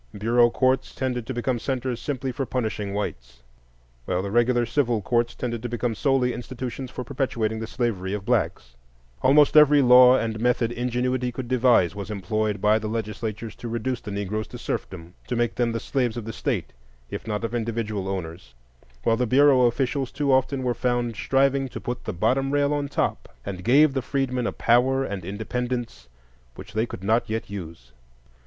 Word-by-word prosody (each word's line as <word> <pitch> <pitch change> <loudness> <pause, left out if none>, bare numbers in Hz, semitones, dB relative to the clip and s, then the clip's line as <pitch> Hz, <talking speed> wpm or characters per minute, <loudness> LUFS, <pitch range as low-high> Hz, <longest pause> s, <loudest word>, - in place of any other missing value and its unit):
Bureau 120 +3 +4
courts 130 +2 +1
tended 125 -3 -2
to 130 - -3
become 120 0 -1
centres 130 -1 -3
simply 135 -2 -3
for 135 +2 -3
punishing 105 -5 -2
whites, 60 -11 -5 0.6
while 90 0 -1
the 100 - -4
regular 120 +1 +3
civil 120 -2 +1
courts 120 +3 0
tended 120 -2 -3
to 120 - -4
become 120 0 -1
solely 130 0 +1
institutions 125 +1 -6
for 125 - -6
perpetuating 120 -4 -2
the 110 - -4
slavery 110 -7 -2
of 100 -1 -4
blacks. - - -1 0.5
Almost 145 +2 +5
every 150 -2 +7
law 125 +1 +8
and 110 -2 -2
method 120 0 +1
ingenuity 125 +1 -1
could 125 0 -6
devise 120 -9 +3
was 100 -1 -7
employed 105 +1 -1
by 105 +2 +3
the 110 - -4
legislatures 110 0 -4
to 120 - -7
reduce 120 +2 -2
the 105 - -8
Negroes 100 +2 -3
to - - -9
serfdom,—to 90 +7 -5
make 120 0 0
them 120 -1 0
the 115 - -2
slaves 125 -2 -1
of 115 - -5
the 115 - -5
State, 85 - -3 0.4
if - - -6
not 105 0 -2
of 115 0 -3
individual 110 -4 -2
owners; 85 -9 -6 0.5
while 115 - +2
the 125 0 0
Bureau 130 0 +5
officials 130 +2 -1
too 140 -1 +1
often 130 0 +1
were 125 -1 +1
found 120 -2 -1
striving 135 +2 +1
to - - -7
put 120 0 -5
the - - -2
"bottom 130 +9 +1
rail 145 +1 +2
on 145 -1 -1
top," - - -2 0.2
and 95 -2 -5
gave 140 +6 +5
the 135 - -1
freedmen 125 -2 -1
a - - -1
power 130 +3 +2
and 100 -5 -5
independence 115 - -4 0.5
which 110 - -11
they 110 +2 0
could 95 - -8
not 110 +4 +1
yet 110 -2 -3
use. 85 -10 -8
120 Hz, 185 wpm, -24 LUFS, 105-130 Hz, 0.6 s, law